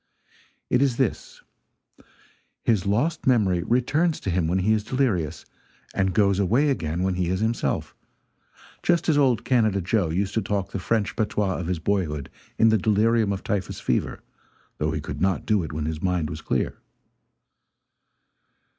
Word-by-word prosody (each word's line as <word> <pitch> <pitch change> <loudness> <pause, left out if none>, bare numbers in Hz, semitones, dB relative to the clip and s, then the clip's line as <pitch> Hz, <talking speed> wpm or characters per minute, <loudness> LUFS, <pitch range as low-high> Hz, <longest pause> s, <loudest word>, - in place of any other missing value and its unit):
It 125 - +3
is 135 -4 +2
this: 130 -6 -2 1.2
his 100 -5 +1
lost 145 +12 0
memory 100 -9 +3
returns 145 - +1
to 95 - -2
him 85 -2 +1
when 90 +3 +1
he 100 +4 +2
is 110 -1 0
delirious, 105 - -1 0.5
and 95 -1 +1
goes 100 -2 +3
away 120 +10 +3
again 85 - -2
when 95 0 +1
he 90 -1 -1
is 95 +1 0
himself 110 +2 -1 0.9
just 175 -1 +1
as 155 - +4
old 130 -6 +2
Canada 110 -6 +2
Joe 90 -1 0
used 95 +5 -1
to 110 - +1
talk 100 -2 -2
the 100 - -3
French 105 +3 -1
patois 105 -3 -1
of 90 - -4
his 90 -1 -1
boyhood 80 -5 -2 0.3
in 115 - +5
the 110 -1 +3
delirium 110 +1 +2
of 100 - -4
typhus 100 -3 -2
fever, - - -1 0.6
though 75 - 0
he 80 -1 -3
could 75 0 -6
not 95 0 +1
do 105 -3 +2
it 80 - -5
when 75 0 -3
his 80 0 -3
mind 90 -4 0
was 80 -1 -6
clear. 65 - -2
100 Hz, 165 wpm, -24 LUFS, 90-115 Hz, 1.2 s, in